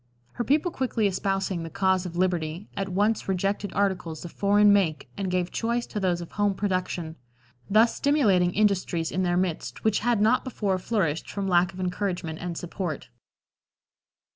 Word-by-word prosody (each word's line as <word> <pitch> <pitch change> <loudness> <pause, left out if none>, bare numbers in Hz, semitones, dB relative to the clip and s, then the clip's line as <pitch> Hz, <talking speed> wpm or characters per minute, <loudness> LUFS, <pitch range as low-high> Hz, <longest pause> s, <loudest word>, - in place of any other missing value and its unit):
Her 240 - -3
people 300 +8 +2
quickly 250 -7 -1
espousing 195 -2 -1
the 165 - -5
cause 190 0 +1
of 170 - -8
liberty, 175 0 -1
at 195 -1 -2
once 205 +3 0
rejected 195 +1 -1
articles 180 -5 -1
of 170 - -7
foreign 205 0 +4
make 175 -6 +1
and 195 -2 -3
gave 180 -1 -1
choice 235 +1 -1
to 210 - -5
those 180 -3 0
of 170 - -9
home 205 -1 +1
production, 185 -4 -2 0.5
thus 220 +3 +4
stimulating 210 -12 +3
industries 185 -5 +1
in 185 - -1
their 175 -1 +1
midst 180 -3 -2
which 220 -2 +2
had 240 -1 +1
not 225 +4 +3
before 205 -7 -1
flourished 180 -7 -1
from 200 -1 -3
lack 180 0 +3
of 185 - -11
encouragement 180 -3 -2
and 175 -1 -4
support. 175 -3 -5
190 Hz, 165 wpm, -26 LUFS, 175-205 Hz, 0.5 s, foreign